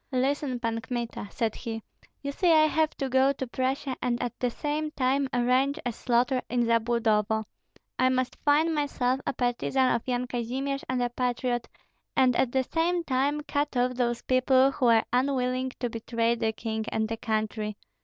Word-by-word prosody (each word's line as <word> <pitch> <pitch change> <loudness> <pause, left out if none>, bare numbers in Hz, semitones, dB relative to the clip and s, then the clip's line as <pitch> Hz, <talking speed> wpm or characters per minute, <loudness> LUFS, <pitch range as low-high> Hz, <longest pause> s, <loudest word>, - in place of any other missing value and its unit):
"Listen, 265 0 0
Pan 230 -1 -2
Kmita," 235 -3 -4
said 225 -2 -1
he, 225 -2 -6 0.4
"you 280 - -2
see 345 +4 +2
I 310 -1 +6
have 310 0 +2
to 275 - -1
go 265 +1 +4
to 265 - -4
Prussia 260 +2 -2
and 245 -1 0
at 245 - -2
the 250 - +1
same 300 +4 -2
time 275 -1 +1
arrange 255 +4 +2
a 245 - 0
slaughter 245 +2 +1
in 240 -1 +1
Zabludovo. 225 -2 +2 0.6
I 255 - +4
must 255 -1 0
feign 305 +3 +3
myself 270 -4 0
a - - 0
partisan 250 +1 +1
of 235 - 0
Yan 250 0 0
Kazimir 255 +3 -2
and 255 -1 0
a 245 - 0
patriot, 245 -1 -1 0.5
and 255 -2 +4
at 240 - +2
the 265 0 +2
same 340 +5 0
time 285 +1 0
cut 290 -2 -2
off 250 +1 +2
those 240 -1 -1
people 260 +1 +4
who 255 -2 +1
are 230 -1 +5
unwilling 255 0 +1
to 245 - 0
betray 230 0 0
the 225 -1 0
king 220 0 -3
and 220 0 0
the 225 0 -3
country. 215 -1 -2
250 Hz, 180 wpm, -27 LUFS, 235-270 Hz, 0.6 s, I